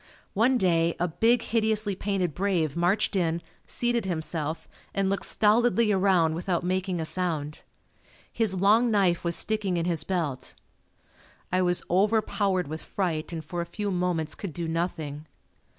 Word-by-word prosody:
One 240 +5 +3
day 170 -5 +2
a 175 - +1
big 225 +8 +2
hideously 220 -3 0
painted 190 -4 -1
brave 175 -6 0
marched 180 +5 +1
in, 170 -3 +1 0.3
seated 240 -3 0
himself 160 -2 -3 0.3
and 195 -1 +1
looked 195 - 0
stolidly 225 +1 +3
around 185 -5 +3
without 175 +1 -1
making 185 0 -1
a 160 - -2
sound. 155 -3 -2 0.7
His 220 -5 +2
long 210 +6 +4
knife 195 -5 +2
was 170 -1 +2
sticking 210 -5 0
in 170 - -1
his 165 -3 -1
belt. 155 -8 -2 1.0
I 185 +1 +2
was 175 -1 +1
overpowered 200 -2 +1
with 155 +2 -5
fright 170 -6 -3
and 160 -2 -6
for 175 +3 -4
a - - -3
few 205 +3 -3
moments 175 -4 0
could 195 -6 -6
do 170 +1 -4
nothing. 160 -3 -3
180 Hz, 150 wpm, -27 LUFS, 165-205 Hz, 1.0 s, long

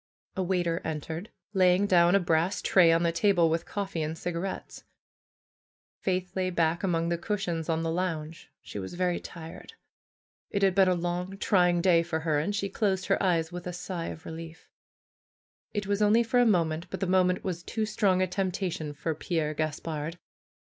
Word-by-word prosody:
A 190 - -1
waiter 175 -2 0
entered, 160 +5 -4 0.2
laying 185 0 +4
down 175 -1 +5
a - - +6
brass 170 +1 +1
tray 175 -3 +5
on 165 +1 +3
the 170 - +2
table 170 -2 +3
with 165 +1 -1
coffee 195 -5 -3
and 155 +1 -3
cigarettes. 175 +3 -5 1.2
Faith 185 -1 -2
lay 185 -1 0
back 170 -1 +1
among 170 -3 0
the 170 -1 -1
cushions 175 -5 -2
on 165 0 0
the 165 - -1
lounge. 165 -2 -3
She 105 - -7
was 95 - -6
very 180 -1 0
tired. 170 - -10 0.8
It 200 -1 -1
had 195 -1 +4
been 190 0 +5
a 185 - +3
long, 175 +2 -3
trying 180 -4 +3
day 170 -2 +5
for 165 -1 -3
her, 155 -2 +1
and 200 +7 -1
she 200 0 -1
closed 190 -2 0
her - - +1
eyes 170 -3 +1
with 175 0 -6
a 180 - -4
sigh 180 -1 -4
of 160 - -8
relief. 165 0 -9 1.0
It 205 -1 -2
was 200 +1 0
only 215 +3 +5
for 235 +2 +2
a 245 - +5
moment, 170 -4 +1
but 190 - -5
the 195 - 0
moment 185 0 +2
was 175 -2 -3
too 220 +4 -2
strong 200 -3 +2
a - - +1
temptation 180 -4 -2
for 160 +3 -2
Pierre 155 -1 -2
Gaspard. 155 +1 -3
175 Hz, 185 wpm, -28 LUFS, 165-190 Hz, 1.2 s, a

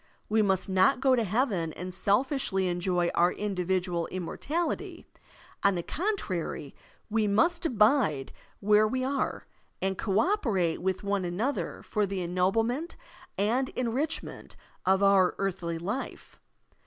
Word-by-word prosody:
We 220 +1 +3
must 190 -2 +2
not 190 +4 +3
go 265 0 +4
to 235 - +1
heaven 200 - 0
and 180 +1 -7
selfishly 205 -2 +1
enjoy 175 0 0
our 175 +1 +3
individual 185 -3 -1
immortality. 290 - -3 0.6
On 200 -1 +3
the 175 - -2
con 405 - -1
trary, 170 - -4 0.4
we 220 -1 +2
must 330 - +2
abide 210 - +2 0.3
where 210 +1 +4
we 255 +3 -1
are, 270 +1 -2 0.3
and 190 0 -2
co 200 -1 +1
operate 220 - +1
with 190 +1 -1
one 200 -1 0
another 205 +11 -2
for 210 -2 0
the 195 0 -3
ennoblement 225 - 0 0.4
and 240 +6 +1
enrich 255 +6 -1
ment - - -11 0.3
of 190 +1 +4
our 195 -2 +4
earthly 180 -4 -2
life. 205 +10 -5
200 Hz, 135 wpm, -28 LUFS, 180-250 Hz, 0.6 s, go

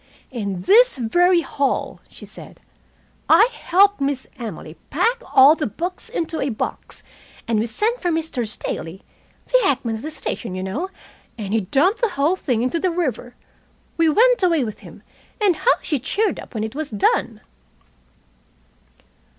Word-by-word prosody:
"In 200 -7 -4
this 485 - +5
very 350 +9 +3
hall," 280 -4 -2
she - - -12
said, - - -10 0.7
"I 460 - +6
helped 400 0 +3
Miss 275 -1 -1
Emily 200 -9 -7
to - - -30
pack 465 - +1
all 275 +3 +8
his 300 -7 -3
books 350 - -5
into 325 -1 -3
a 275 - 0
box, 220 - -5 0.4
and 225 -2 +1
we 225 - 0
sent 435 - -1
for 355 - 0
Mr. 320 -8 -2
Staley 190 -3 -5 0.4
the - - +3
hackman 250 - 0
at - - -10
the 310 - -5
station, 240 -9 -5
you 185 - -4
know 275 - -3 0.5
and 205 -2 -4
he 225 - +2
dumped 290 - +1
the 470 - +2
whole 330 0 +1
thing 245 -10 -1
into 255 +7 0
the 370 - +1
river. 265 -8 -3 0.6
We 330 -1 +3
went 485 +8 +4
away 335 -6 +3
with 215 -3 -6
him, - - -14 0.4
and 400 -5 +3
how - - +3
she 295 -5 -1
cheered 405 - -1
up - - -12
when 215 - -2
it 220 - -4
was 300 +1 -4
done!" 215 +1 0
285 Hz, 165 wpm, -21 LUFS, 225-360 Hz, 0.7 s, all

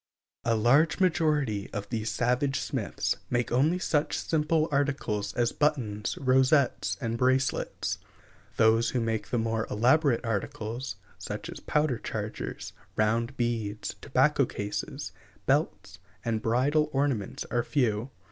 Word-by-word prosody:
A 115 -1 +2
large 135 - +4
majority 150 - +1
of 100 0 -4
these 115 -2 -2
savage 125 +3 +1
smiths - - -2
make 120 -1 0
only 145 +8 +3
such 155 -4 0
simple 155 0 +1
articles 140 -8 0
as 120 -1 +1
buttons, 120 -9 0
rosettes, 130 +1 +3
and 115 -3 -2
bracelets; 130 +1 0 0.6
those 115 +1 +4
who 125 - 0
make 110 -3 -2
the 120 - 0
more 115 0 -1
elaborate 125 +4 +3
articles, 115 +3 -3 0.2
such - - -5
as - - -8
powder 150 -5 0
chargers, - - -5 0.2
round 115 +4 +1
beads 110 -3 -2
(Pl. - - -28
XVI), - - -32
tobacco 140 +1 +3
cases, 105 0 -4 0.3
belts, - - 0 0.3
and 115 -2 0
bridle 140 +7 +2
ornaments 135 -8 -1
are 120 - +2
few. 120 -3 0
125 Hz, 130 wpm, -28 LUFS, 110-145 Hz, 0.6 s, large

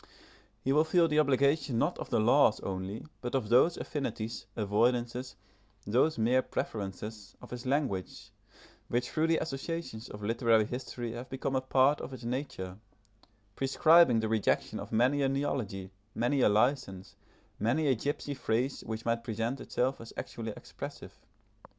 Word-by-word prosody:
He 135 - +2
will 150 +2 +5
feel 165 +1 +3
the 155 -1 +2
obligation 140 -2 +2
not - - 0
of - - -6
the - - +2
laws - - +4
only, 95 +2 -4 0.2
but 125 +1 -3
of 120 -6 -1
those 130 +9 +5
affinities, 115 -6 -4
avoidances, 120 +4 0 0.5
those 125 +9 +2
mere 120 +3 +3
preferences, 105 -1 -5
of - - -13
his 125 +1 -6
language, 130 -10 -2 0.6
which 120 +1 -1
through 155 +1 +1
the 165 0 +3
associations 155 -5 -4
of 105 0 -9
literary 115 0 +3
history 120 0 -5
have 120 +2 -7
become 135 0 -2
a 130 - +2
part 135 +2 +3
of 135 - -7
its 125 -2 -9
nature, 120 -7 -4 0.8
prescribing 135 -2 +5
the 110 - -1
rejection 110 -2 0
of - - -8
many 125 +6 +3
a 135 - +2
neology, 125 -9 -2 0.2
many 130 +4 +1
a - - +5
license, 105 -4 0 0.4
many 120 +9 +1
a 135 - +4
gipsy 145 +4 -3
phrase 130 0 -1
which 110 0 -5
might 115 0 0
present 115 +3 -2
itself 130 +1 -1
as 115 - -10
actually 115 -1 -5
expressive. - - -9
125 Hz, 155 wpm, -31 LUFS, 110-140 Hz, 0.8 s, will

